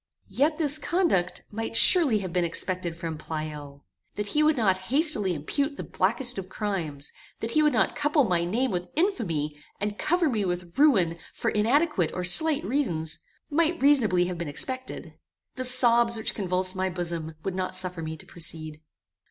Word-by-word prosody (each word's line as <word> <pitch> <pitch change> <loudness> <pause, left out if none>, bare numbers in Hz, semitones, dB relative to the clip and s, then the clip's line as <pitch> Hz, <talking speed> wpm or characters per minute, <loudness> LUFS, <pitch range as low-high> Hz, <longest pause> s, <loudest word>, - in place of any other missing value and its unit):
Yet 300 +4 +1
this 305 -2 +4
conduct 315 - 0
might 225 +1 -5
surely 295 - +6
have 175 - -6
been 180 - +1
expected 170 0 -2
from 165 -2 -5
Pleyel. 150 -3 -7 0.3
That 205 -1 -3
he 300 - +1
would 305 -1 +3
not 195 -5 +2
hastily 270 - +3
impute 280 - -3
the - - -5
blackest 235 +4 -1
of 185 -1 -8
crimes, 170 -10 -4 0.3
that 225 - -4
he 305 - +3
would 300 0 +3
not - - +1
couple 295 0 +2
my 180 -6 +1
name 230 +9 -1
with 180 -1 -4
infamy, 165 - -1 0.2
and 205 +1 -4
cover 350 0 +1
me 225 -7 -1
with 175 -2 -4
ruin 195 - +3 0.2
for 230 - -1
inadequate 230 - +1
or 180 - -3
slight 310 - +4
reasons, 170 - -1 0.3
might 335 +3 +1
reasonably 230 -11 +3
have 180 -1 -5
been 170 - -4
expected." 255 - -5 0.3
The 255 - -3
sobs 235 -2 +5
which 220 - -2
convulsed 185 -1 -1
my 190 0 -1
bosom 170 -3 -4
would 195 - -3
not 185 0 -3
suffer 185 -2 -2
me 160 0 -5
to - - -15
proceed. 155 -2 -5
195 Hz, 175 wpm, -26 LUFS, 170-275 Hz, 0.3 s, surely